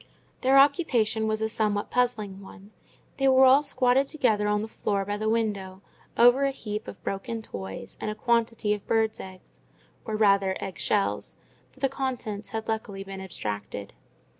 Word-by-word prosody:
Their 265 +1 +4
occupation 245 -7 +3
was 215 0 -1
a - - +2
somewhat 210 -1 0
puzzling 215 -6 0
one: 200 +1 -14 0.5
they 270 - +2
were 265 0 +6
all 265 +2 +7
squatted 265 -1 +2
together 220 -9 +1
on 210 0 +1
the - - -4
floor 200 -2 -2
by 205 +1 -2
the 215 +1 -1
window, 200 -4 -2 0.3
over 245 +3 +6
a 275 - +3
heap 215 -5 -5
of - - -10
broken 225 +3 -4
toys 95 - -8
and - - -2
a 215 - -4
quantity 230 -2 +1
of 205 -1 -7
birds' 220 -1 +1
eggs—or 190 +3 -11
rather 200 -3 +3
egg 190 - -6
shells, 200 -2 0 0.3
for 265 - -22
the 270 - +3
contents 250 -6 -4
had 220 0 -5
luckily 210 -3 -3
been 195 0 -8
abstracted. 105 - -5
215 Hz, 165 wpm, -27 LUFS, 200-245 Hz, 0.5 s, all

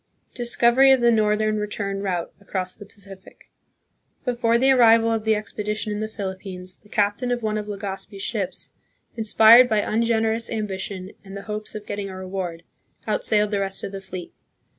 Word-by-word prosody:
Discovery 240 +2 +4
of 265 - +5
the 240 0 +4
Northern 215 -1 +2
Return 200 -1 -3
Route 180 -4 -3
across 185 -2 -4
the 205 - -12
Pacific. 195 -2 -14 0.7
Before 235 -2 +2
the 265 +3 +4
arrival 230 -3 +5
of 225 -1 -1
the 220 0 +3
expedition 210 0 -4
in 210 - -3
the 215 - -2
Philippines, 190 -3 -7
the 210 - -23
captain 205 +4 0
of 245 -1 -1
one 215 -1 -1
of 210 -1 -3
Legazpi's 200 0 -6
ships, 205 -6 -1 0.4
in 225 -2 -3
spired 230 +3 +7
by 215 - +2
ungenerous 225 +1 0
ambition 195 -3 -4
and 195 0 -9
the 200 - -8
hopes 215 0 -5
of 210 -1 -7
getting 205 -1 -4
a 190 - -8
reward, 185 -3 -5 0.4
outsailed 210 0 +1
the 205 - 0
rest 195 -1 -1
of - - -4
the 195 -1 -7
fleet. 185 -2 -8
210 Hz, 175 wpm, -23 LUFS, 195-225 Hz, 0.7 s, spired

